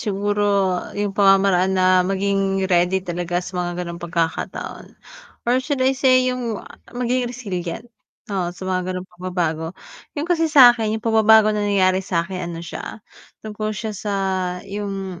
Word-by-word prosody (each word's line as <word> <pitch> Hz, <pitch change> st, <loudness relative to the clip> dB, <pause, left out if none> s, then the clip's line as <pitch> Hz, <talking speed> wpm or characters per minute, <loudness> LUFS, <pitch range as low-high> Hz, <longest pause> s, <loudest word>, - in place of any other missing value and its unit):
siguro 200 Hz, -2 st, 0 dB, 0.2 s
yung 205 Hz, -1 st, -1 dB
pamamaraan 195 Hz, -1 st, +3 dB
na 185 Hz, 0 st, +4 dB
maging 195 Hz, 0 st, 0 dB
ready 185 Hz, +1 st, +2 dB
talaga 175 Hz, 0 st, -3 dB
sa 180 Hz, -1 st, -4 dB
mga 175 Hz, 0 st, -3 dB
ganong 170 Hz, 0 st, -7 dB
pagkakataon, 170 Hz, -1 st, -4 dB, 0.5 s
or 245 Hz, +2 st, +2 dB
should 285 Hz, +2 st, -2 dB
I 265 Hz, -, +4 dB
say 255 Hz, -1 st, +3 dB
yung 250 Hz, -3 st, -2 dB, 0.3 s
maging 245 Hz, 0 st, -1 dB
resilient, 225 Hz, -2 st, -6 dB, 0.4 s
oo 180 Hz, -3 st, -1 dB
sa 175 Hz, +2 st, -10 dB
mga 185 Hz, 0 st, -2 dB
ganong 185 Hz, -, -5 dB
pagbabago. 175 Hz, -2 st, -3 dB, 0.4 s
Yun 290 Hz, -, -1 dB
kasi 330 Hz, -2 st, +1 dB
sakin, 240 Hz, -6 st, +6 dB
yung 220 Hz, -, -9 dB
pagbabago 220 Hz, -1 st, +5 dB
na 210 Hz, -, -1 dB
nangyayari 190 Hz, -1 st, +3 dB
sa 175 Hz, -3 st, -1 dB
akin, 180 Hz, -1 st, -5 dB
ano 170 Hz, 0 st, -6 dB
siya, 200 Hz, +4 st, -8 dB, 0.4 s
tungkol 215 Hz, 0 st, -4 dB
siya 220 Hz, +1 st, -4 dB
sa 205 Hz, 0 st, -4 dB, 0.5 s
yung, 195 Hz, -2 st, -5 dB
195 Hz, 150 wpm, -21 LUFS, 180-220 Hz, 0.5 s, sakin